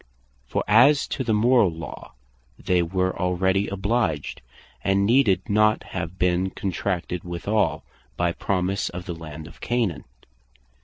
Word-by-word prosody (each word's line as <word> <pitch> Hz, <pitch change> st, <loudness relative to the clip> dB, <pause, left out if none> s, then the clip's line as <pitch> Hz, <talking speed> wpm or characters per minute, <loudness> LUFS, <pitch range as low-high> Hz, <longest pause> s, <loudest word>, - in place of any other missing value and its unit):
For -, -, -1 dB
as 125 Hz, +7 st, +5 dB
to 130 Hz, -, -2 dB
the 115 Hz, -, -1 dB
Morall 110 Hz, -1 st, +4 dB
law, 85 Hz, -, -9 dB, 0.4 s
they 90 Hz, -1 st, +1 dB
were 95 Hz, +2 st, -1 dB
already 95 Hz, +2 st, +1 dB
obliged, 100 Hz, -6 st, -1 dB, 0.4 s
and 100 Hz, 0 st, +2 dB
needed 115 Hz, -4 st, +3 dB
not 110 Hz, +1 st, +3 dB
have 85 Hz, +3 st, -6 dB
been 90 Hz, +1 st, +1 dB
contracted 90 Hz, -2 st, -3 dB
withall, 90 Hz, +1 st, -1 dB, 0.3 s
by 85 Hz, 0 st, +1 dB
promise 95 Hz, +2 st, -1 dB
of 90 Hz, 0 st, -7 dB
the 90 Hz, -, -4 dB
Land 80 Hz, -2 st, -9 dB
of 85 Hz, -, -14 dB
Canaan. 115 Hz, -9 st, -1 dB
95 Hz, 135 wpm, -24 LUFS, 85-105 Hz, 0.4 s, as